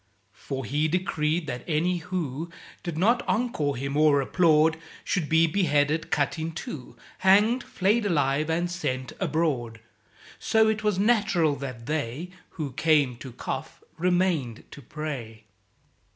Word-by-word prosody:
For 135 +2 -6
he 145 +7 0
decreed 165 -1 0
that 125 -4 -5
any 175 +3 +1
who 170 -3 -4 0.3
Did 170 -3 -5
not 230 +8 +3
encore 160 - 0
him 140 +2 -3
or 150 -1 +5
applaud, 160 +2 +3 0.3
Should 170 -7 -1
be 160 0 +5
beheaded, 155 -3 +1
cut 145 +2 0
in 160 +1 -3
two, 140 -4 -7 0.2
Hanged, 210 +6 +4
flayed 205 +3 +1
alive, 150 -3 +1
and 175 +2 0
sent 130 -7 -3
abroad. 130 -9 -1 0.6
(So 220 0 +3
it 215 0 0
was 210 -3 +1
natural 195 -8 +2
that 130 -4 -7
they 150 +4 -3 0.3
Who 150 -5 -3
"came 145 -2 +2
to 130 +1 -9
cough - - -6
remained 175 -8 0
to 145 - -10
pray.") 130 -6 -6
155 Hz, 135 wpm, -26 LUFS, 140-180 Hz, 0.6 s, or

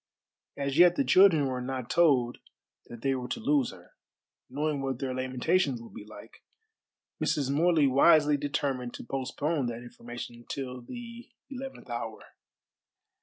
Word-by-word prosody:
As 140 +1 -1
yet 175 0 +7
the - - +2
children 185 - +5
were 130 -1 -2
not 130 -1 -4
told 135 -8 +3 0.5
that 120 -1 -11
they 135 -1 +2
were 125 -1 -4
to 120 - -4
lose 145 -3 +2
her. 90 -1 -14 0.6
Knowing 145 +2 -1
what 135 -2 -2
their 130 0 -3
lamentations 130 +3 0
would 115 - -12
be - - -9
like, 105 - -13 0.8
Mrs. 140 -2 0
Morley 160 +1 +3
wisely 150 +2 +5
determined 140 -3 -2
to - - -8
postpone 135 +3 -2
that 120 0 -5
information 120 0 -9
till 130 -2 -5
the 235 - -9 0.2
eleventh 265 - -8
hour. 115 -2 -4
135 Hz, 145 wpm, -29 LUFS, 125-155 Hz, 0.8 s, yet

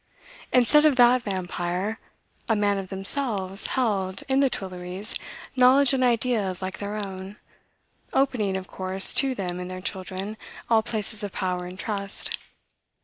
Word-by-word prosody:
Instead 255 +5 +5
of 305 -3 +5
that 245 0 +6
vampire, 185 0 -3 0.5
a 225 - +4
man 205 -1 +1
of 190 -1 -7
themselves 195 -1 0
held, 195 -6 0
in 265 0 +3
the 275 -1 +4
Tuilleries, 185 0 -4 0.4
knowledge 260 +2 +5
and 260 -1 +2
ideas 230 -6 +1
like 190 0 -5
their 205 +1 -4
own, 190 +1 -8 0.8
opening, 220 -8 +1
of 190 - -6
course, 190 +1 +3
to 270 -1 +3
them 180 -4 -3
and 180 0 -5
their 185 0 -6
children, 190 +2 -4 0.3
all 225 -1 +6
places 220 -2 -2
of 205 -2 -4
power 180 -1 -2
and 180 +1 -9
trust. 200 -1 -2
200 Hz, 145 wpm, -25 LUFS, 185-240 Hz, 0.8 s, that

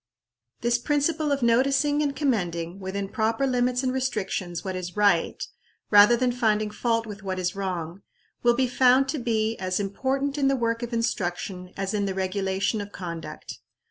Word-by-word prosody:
This 235 0 +2
principle 295 +3 0
of 275 -3 0
noticing 275 +5 +3
and 285 -2 -1
commending, 180 - -1
within 195 +1 -4
proper 225 +5 0
limits 250 0 +1
and 255 -1 0
restrictions, 195 -9 -2
what 190 -1 -3
is 180 +1 -6
right, 200 -5 +2 0.5
rather 210 +3 +7
than 250 0 +1
finding 215 -3 +1
fault 230 +1 0
with 210 -1 -8
what 190 -1 -3
is 180 0 -2
wrong, 185 -2 -4 0.4
will 240 0 +4
be 260 +1 +2
found 255 +2 +4
to 295 - -1
be 225 -2 0
as 185 0 -1
important 270 +8 -1
in 275 - +3
the 275 - +3
work 230 -1 -1
of 240 0 -4
instruction 185 -5 -2
as 195 0 -2
in 205 -1 0
the 190 - -3
regulation 190 +2 -1
of 205 0 -8
conduct. 170 -4 -7
220 Hz, 175 wpm, -25 LUFS, 190-255 Hz, 0.5 s, rather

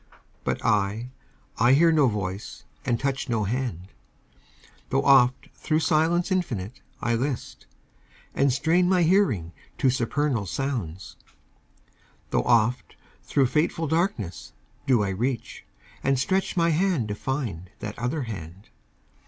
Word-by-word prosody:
But - - -2
I 105 +3 +1 0.5
I 120 +3 +5
hear 165 +4 +5
no 150 -4 +4
voice 100 -3 -4 0.2
and 120 -2 +1
touch 135 -1 -2
no 115 -3 +1
hand, 105 -5 -3 1.0
Tho' 135 +1 +1
oft 130 -2 +4
thro' 155 - -1
silence 165 +3 +2
infinite 130 - -2 0.2
I 120 - 0
list, 130 +2 -3 0.7
And 140 -1 +2
strain 170 +7 +2
my 185 -2 +4
hearing 150 - +2 0.3
to 130 - +3
supernal 130 -2 -1
sounds; 105 - -4 1.1
Tho' - - +2
oft 120 +1 +1 0.3
thro' 140 - +1
fateful 155 +4 0
darkness 160 - -2 0.3
do 125 -5 +4
I 100 - -1
reach, 120 +6 -3 0.4
And 135 0 +2
stretch 190 +8 0
my 170 0 +3
hand 165 - +1
to - - -1
find 105 - -4
that 105 0 -7
other 130 +5 -1
hand. 95 -3 -8
130 Hz, 130 wpm, -25 LUFS, 105-155 Hz, 1.1 s, I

